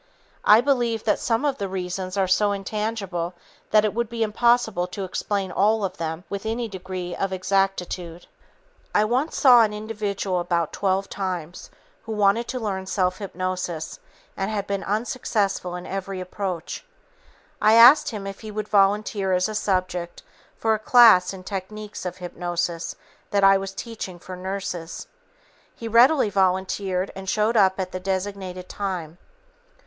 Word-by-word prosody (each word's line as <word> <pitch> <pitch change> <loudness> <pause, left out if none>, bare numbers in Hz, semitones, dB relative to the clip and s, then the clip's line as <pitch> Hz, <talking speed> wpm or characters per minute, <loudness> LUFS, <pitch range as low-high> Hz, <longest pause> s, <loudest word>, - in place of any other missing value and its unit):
I 215 +2 +7
believe 240 -5 +1
that 215 - +1
some 230 +4 0
of 280 -2 0
the 200 - -2
reasons 185 0 -4
are 190 -1 +2
so 205 +2 +3
intangible 195 -3 -3 0.3
that 215 0 +4
it 210 - 0
would 235 0 -1
be 230 -1 -1
impossible 220 -4 +2
to 195 +2 -6
explain 190 +1 -2
all 210 +3 +2
of 190 - -5
them 160 +1 -4
with 200 0 -5
any 230 +2 -2
degree 185 -3 -6
of 195 - -2
exactitude. 185 -2 -1 0.7
I 210 - +4
once 255 +8 0
saw 250 -4 +7
an 215 -2 +2
individual 205 -3 -2
about 170 -2 -1
12 195 0 0
times 180 -4 -5 0.3
who 225 - -6
wanted 210 +3 +2
to 255 - -3
learn 190 -4 -3
self 185 -1 0
hypnosis 185 -4 -4 0.4
and 195 +1 -2
had 205 -2 -2
been 200 -1 -3
unsuccessful 205 -4 -1
in 180 0 -7
every 195 0 -4
approach. 185 - -4 0.8
I 215 - +5
asked 250 +6 +8
him 210 -5 -6
if 195 0 -6
he 220 - -8
would 210 0 -4
volunteer 200 -1 +2
as 180 +1 +2
a 215 - -5
subject 185 -4 -2 0.3
for 225 -1 +2
a 215 - -1
class 220 -5 +6
in 190 -1 -9
techniques 205 +1 -6
of 180 - -6
hypnosis 175 -1 -3 0.3
that 200 -1 +1
I 195 0 +7
was 195 0 -5
teaching 195 -3 -7
for 185 +1 -9
nurses. 185 -2 -5 0.7
He 230 - -7
readily 235 +1 +5
volunteered 190 0 0
and 190 0 -6
showed 215 +3 +1
up 190 -3 +4
at 185 -1 -3
the 185 - -4
designated 190 -1 -4
time. 180 -5 -4
195 Hz, 160 wpm, -24 LUFS, 185-215 Hz, 0.8 s, asked